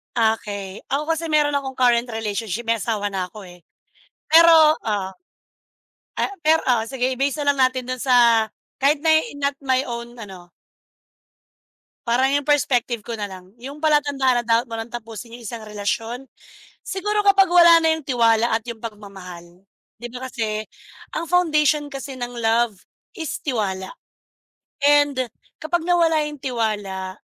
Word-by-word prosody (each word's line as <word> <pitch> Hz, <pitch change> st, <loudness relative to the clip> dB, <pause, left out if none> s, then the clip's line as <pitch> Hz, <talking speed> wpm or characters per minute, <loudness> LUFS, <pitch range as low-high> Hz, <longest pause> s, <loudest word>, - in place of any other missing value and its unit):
Okey. 210 Hz, -4 st, -1 dB
Ako 295 Hz, +3 st, -1 dB
kasi 325 Hz, 0 st, -2 dB
meron 295 Hz, -1 st, +2 dB
akong 270 Hz, -1 st, -2 dB
current 240 Hz, -2 st, +3 dB
relationship 220 Hz, 0 st, -4 dB
may 230 Hz, -, +3 dB
asawa 215 Hz, -2 st, -2 dB
na 190 Hz, -2 st, -4 dB
ako, 210 Hz, -3 st, -11 dB
eh, 175 Hz, -1 st, -16 dB, 0.7 s
pero 320 Hz, -1 st, +7 dB
ah, 200 Hz, -3 st, -1 dB, 1.1 s
ah, 400 Hz, -, -1 dB
pero 320 Hz, +1 st, +4 dB
oo 240 Hz, -3 st, +2 dB
sige 260 Hz, 0 st, -1 dB
i-base 275 Hz, +3 st, -1 dB
na 285 Hz, -, +4 dB
lang 275 Hz, -, -8 dB
natin 255 Hz, -1 st, -5 dB
dun 255 Hz, -, -4 dB
sa 235 Hz, -4 st, +4 dB, 0.3 s
kahit 285 Hz, +2 st, +3 dB
na 320 Hz, -, +4 dB, 0.3 s
not 280 Hz, 0 st, -1 dB
my 260 Hz, -1 st, +2 dB
own 235 Hz, 0 st, -6 dB
ano 190 Hz, -4 st, -10 dB, 1.6 s
Parang 260 Hz, +4 st, +2 dB
yung 285 Hz, -1 st, 0 dB
perspective 245 Hz, -6 st, +1 dB
ko 235 Hz, -, -5 dB
nalang. 190 Hz, -3 st, -7 dB
Yung 275 Hz, +3 st, -8 dB
palatandaan 285 Hz, -5 st, +2 dB
na -, -, -16 dB
dapat 230 Hz, +1 st, +2 dB
mo 230 Hz, -, -11 dB
ng 225 Hz, +1 st, -6 dB
tapusin 230 Hz, 0 st, -8 dB
yung 240 Hz, -, -13 dB
isang 230 Hz, +1 st, -6 dB
relasyon? 220 Hz, +4 st, -4 dB, 0.6 s
Siguro 415 Hz, +2 st, -1 dB
kapag 390 Hz, -2 st, +5 dB
wala 340 Hz, -1 st, +7 dB
na 320 Hz, -, +3 dB
yung 310 Hz, -, -11 dB
tiwala 230 Hz, -3 st, +2 dB
at 225 Hz, -, +1 dB
yung 235 Hz, -, -6 dB
pagmamahal. 190 Hz, -5 st, -11 dB, 0.3 s
Di 240 Hz, -, -7 dB
ba 260 Hz, +1 st, -6 dB
kasi 215 Hz, -3 st, -3 dB, 0.6 s
ang -, -, -3 dB
foundation 305 Hz, -4 st, +2 dB
kasi 275 Hz, -1 st, -7 dB
ng 245 Hz, -1 st, -6 dB
love 230 Hz, -1 st, +1 dB, 0.4 s
is 320 Hz, -3 st, -4 dB
tiwala, 195 Hz, -8 st, -2 dB, 0.9 s
and 285 Hz, -4 st, +3 dB, 0.3 s
kapag 325 Hz, +1 st, -1 dB
nawala 330 Hz, -3 st, +3 dB
yung 295 Hz, -1 st, -9 dB
tiwala 205 Hz, -7 st, -3 dB
245 Hz, 150 wpm, -22 LUFS, 220-290 Hz, 1.6 s, pero